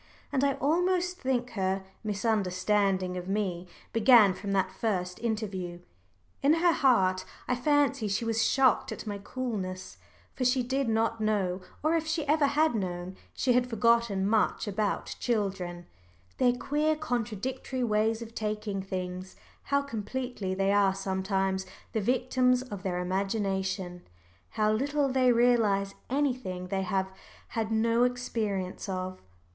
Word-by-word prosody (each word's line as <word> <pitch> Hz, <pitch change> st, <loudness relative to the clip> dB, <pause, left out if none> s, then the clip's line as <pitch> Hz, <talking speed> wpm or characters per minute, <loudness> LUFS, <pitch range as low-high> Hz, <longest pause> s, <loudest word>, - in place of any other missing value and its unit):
And 275 Hz, -1 st, +1 dB
I 280 Hz, -1 st, +3 dB
almost 360 Hz, +5 st, +1 dB
think 250 Hz, -2 st, 0 dB
her 190 Hz, -2 st, -1 dB, 0.2 s
misunderstanding 195 Hz, -3 st, +1 dB
of 180 Hz, 0 st, -6 dB
me 190 Hz, -3 st, -2 dB, 0.3 s
began 225 Hz, -3 st, +7 dB
from 195 Hz, +2 st, -5 dB
that 190 Hz, -1 st, +1 dB
first 185 Hz, -3 st, -2 dB
interview. 200 Hz, -6 st, -3 dB, 0.6 s
In 285 Hz, +2 st, +5 dB
her 345 Hz, +1 st, +4 dB
heart 190 Hz, -11 st, +3 dB, 0.2 s
I 250 Hz, -, +1 dB
fancy 275 Hz, -2 st, +2 dB
she 205 Hz, +3 st, -1 dB
was 225 Hz, 0 st, +1 dB
shocked 265 Hz, -3 st, +3 dB
at -, -, -6 dB
my 205 Hz, -2 st, -4 dB
coolness, 200 Hz, -6 st, -5 dB, 0.3 s
for 260 Hz, -, -3 dB
she 250 Hz, 0 st, +3 dB
did 265 Hz, 0 st, -1 dB
not 225 Hz, 0 st, +1 dB
know, 195 Hz, -4 st, 0 dB, 0.2 s
or 315 Hz, +2 st, +3 dB
if 325 Hz, -1 st, -1 dB
she 320 Hz, -1 st, -1 dB
ever 300 Hz, -1 st, +4 dB
had 310 Hz, +1 st, +2 dB
known, 185 Hz, -3 st, -3 dB, 0.2 s
she 255 Hz, -, +2 dB
had 250 Hz, 0 st, +2 dB
forgotten, 230 Hz, -3 st, +2 dB
much 215 Hz, 0 st, +1 dB
about 205 Hz, 0 st, -1 dB
children 190 Hz, -6 st, -2 dB, 0.5 s
their 245 Hz, -1 st, +4 dB
queer 295 Hz, +5 st, 0 dB
contradictory 255 Hz, -2 st, -3 dB
ways 220 Hz, 0 st, +1 dB
of 230 Hz, 0 st, -11 dB
taking 210 Hz, -2 st, -3 dB
things, 185 Hz, -1 st, -5 dB, 0.3 s
how 280 Hz, 0 st, +1 dB
completely 240 Hz, -5 st, -4 dB
they 195 Hz, +1 st, +2 dB
are 200 Hz, -2 st, +3 dB
sometimes 190 Hz, 0 st, -1 dB, 0.2 s
the 220 Hz, -, -1 dB
victims 250 Hz, +2 st, +2 dB
of 205 Hz, -7 st, -7 dB
their 185 Hz, -2 st, -2 dB
imagination, 190 Hz, -1 st, -2 dB, 0.5 s
how 215 Hz, -1 st, +1 dB
little 280 Hz, +5 st, +1 dB
they 255 Hz, -1 st, +4 dB
realise 225 Hz, -5 st, +3 dB, 0.2 s
anything 250 Hz, -10 st, -1 dB
they 195 Hz, 0 st, 0 dB
have 190 Hz, 0 st, -1 dB, 0.4 s
had 225 Hz, -1 st, -2 dB
no 230 Hz, +2 st, +3 dB
experience 215 Hz, -7 st, -2 dB
of. 185 Hz, 0 st, -4 dB
215 Hz, 140 wpm, -29 LUFS, 190-250 Hz, 0.6 s, began